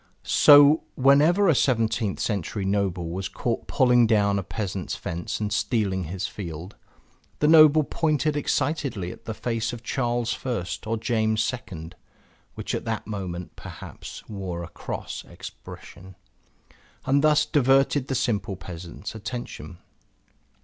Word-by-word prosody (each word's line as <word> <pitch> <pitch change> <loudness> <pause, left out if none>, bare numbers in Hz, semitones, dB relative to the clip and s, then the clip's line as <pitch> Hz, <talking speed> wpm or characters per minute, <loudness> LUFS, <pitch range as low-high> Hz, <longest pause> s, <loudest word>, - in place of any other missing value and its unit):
So 145 +1 +7
whenever 150 +9 +4
a 165 - +5
seventeenth 115 -6 +1
century 100 -1 -2
noble 95 -4 -1
was 95 +2 -4
caught 115 -2 -3
pulling 125 -3 +4
down 100 -3 +2
a - - -4
peasant's 95 -1 -4
fence 85 0 -4
and 105 -1 -2
stealing 105 -4 0
his 90 +3 -4
field, 85 -1 -7 0.6
the 150 - +2
noble 155 -1 +7
pointed 155 0 0
excitedly 140 - -1
at - - -13
the 110 - -4
face 115 0 -2
of 120 -1 -8
Charles 120 -2 -1
I 120 -9 -2 0.2
or 115 +1 0
James 110 0 0
II 90 -10 -8 0.6
(which - - -5
at - - -3
that - - -3
moment, 90 -4 -6
perhaps, - - -10
wore 95 -4 -5
a 85 - -8
cross - - -6
expression) 95 0 -11 0.9
and 140 +2 +2
thus 150 0 +4
diverted 135 -1 +3
the 135 - -2
simple 105 -4 -1
peasant's 90 +1 -8
attention. 110 -4 -7
110 Hz, 135 wpm, -25 LUFS, 95-135 Hz, 0.9 s, So